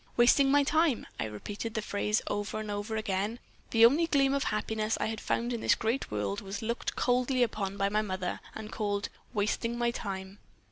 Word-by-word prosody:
"'Wasting 260 +3 +6
my 285 +1 +5
time.' 315 -2 +2
I - - 0
repeated 205 - -5
that 220 - -1
phrase 210 +1 0
over 205 +1 -2
and 215 -1 -4
over 205 +2 -3
again. 210 +1 -1 0.3
The 225 0 +7
only 300 +8 +5
gleam 275 -3 +3
of 280 - 0
happiness 215 +1 -1
I - - +1
had 220 -1 -3
found 240 +1 -1
in 230 - -3
this - - +4
great 230 +5 -1
world 105 -2 -2
was 200 +3 -5
looked 235 +2 -2
coldly 250 +1 +2
upon 200 -4 -2
by 195 - +2
my 210 +1 +2
mother, 185 -3 -3 0.2
and 220 -1 -7
called 205 -2 -1 0.3
'wasting 225 +3 0
my 240 0 +1
time.' 195 -3 -5
220 Hz, 195 wpm, -30 LUFS, 205-240 Hz, 0.3 s, The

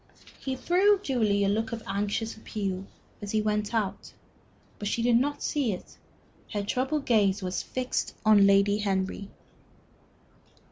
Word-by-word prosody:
He 265 -1 -3
threw 380 +9 +3
Julie 215 - +1
a - - +2
look 220 +3 0
of 230 -1 -5
anxious 205 +3 -2
appeal 195 -3 -4 0.3
as 205 - -6
he 215 - +3
went 210 -1 0
out. 220 -5 -2 0.7
But 205 - -3
she 230 +3 -1
did 240 0 +4
not 290 +4 -1
see 270 -8 0
it; 180 - -9 0.6
her 205 -1 -1
troubled 265 +7 -1
gaze 205 -4 +2
was 180 0 -2
fixed 255 0 -3
on 205 -2 +7
Lady 200 +1 +4
Henry. 195 0 -2
210 Hz, 145 wpm, -28 LUFS, 200-245 Hz, 0.7 s, on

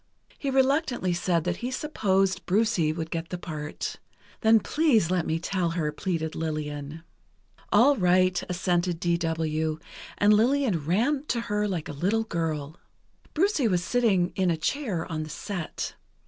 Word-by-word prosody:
He 280 - -2
reluctantly 265 - +2
said 175 -1 0
that 175 0 -1
he 245 - -3
supposed 195 -9 0
"Brucie" 190 -5 +2
would 160 0 -5
get 165 0 -3
the 180 - -4
part. 155 -4 -5 0.4
"Then 225 0 +5
please 235 - +2
let 180 -2 0
me 160 - +1
tell 175 +1 -1
her," 150 -3 0
pleaded 160 -1 -2
Lillian. 150 -1 -4 0.7
"All 250 +7 +6
right," 185 -3 +3
assented 175 -1 0
D. 170 -1 +1
W., 160 -2 -1 0.4
and 205 +1 +5
Lillian 230 - +2
ran 260 - +1
to 235 - 0
her 210 -2 -1
like 180 -6 -3
a - - -5
little 195 +10 +1
girl. 160 -5 -3 0.6
Brucie 320 - +2
was 180 -2 +1
sitting 195 -7 +2
in 190 -2 +2
a 165 - +1
chair 190 - -2
on 160 -3 -4
the 155 - -6
set. 175 +1 -5
180 Hz, 155 wpm, -27 LUFS, 160-225 Hz, 0.7 s, All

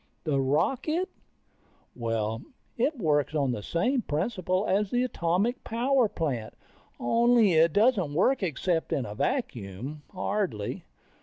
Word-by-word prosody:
The 140 -3 +1
rocket? 270 - 0 0.9
Well, 115 -1 -2 0.3
it 275 +5 0
works 155 - +1
on 140 -4 +1
the 110 - -3
same 240 - 0
principle 185 +2 -1
as 200 +1 +1
the 245 +3 +1
atomic 200 +1 0
power 245 +1 +2
plant, 130 - -3 0.4
only 230 - +4
it 160 +1 +5
doesn't 205 - +2
work 250 - +3
except 170 0 -1
in 130 - 0
a 105 - -6
vacuum, 130 - -3
hardly. 185 - -2
175 Hz, 125 wpm, -28 LUFS, -, 0.9 s, it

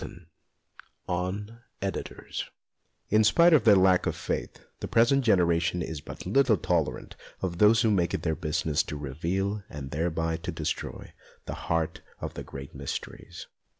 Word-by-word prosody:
XVIII 85 +1 -9 0.8
ON 100 +6 -3 0.2
EDITORS 95 0 -5 0.6
IN 110 +1 +5
spite 170 +10 +6
of 140 -8 +5
their 105 -3 +8
lack 95 -1 +4
of - - -1
faith, - - -4
the - - -4
present 130 +4 +4
generation 90 -5 +2
is 80 -2 -5
but - - -9
little 135 -6 +3
tolerant 85 -2 -1 0.3
of 90 -2 -3
those 105 +2 +6
who 110 - +3
make 90 -4 +1
it - - -5
their 80 - +1
business 80 -1 0
to 75 - -5
reveal, 90 +9 -2
and 70 -2 -7
thereby 80 +1 -1
to 80 - -5
destroy, - - -4 0.3
the - - -4 0.2
heart 80 -1 0 0.2
of - - -5
the - - -6
great 70 +3 -9
mysteries. 70 0 -6
90 Hz, 155 wpm, -28 LUFS, 80-105 Hz, 0.8 s, their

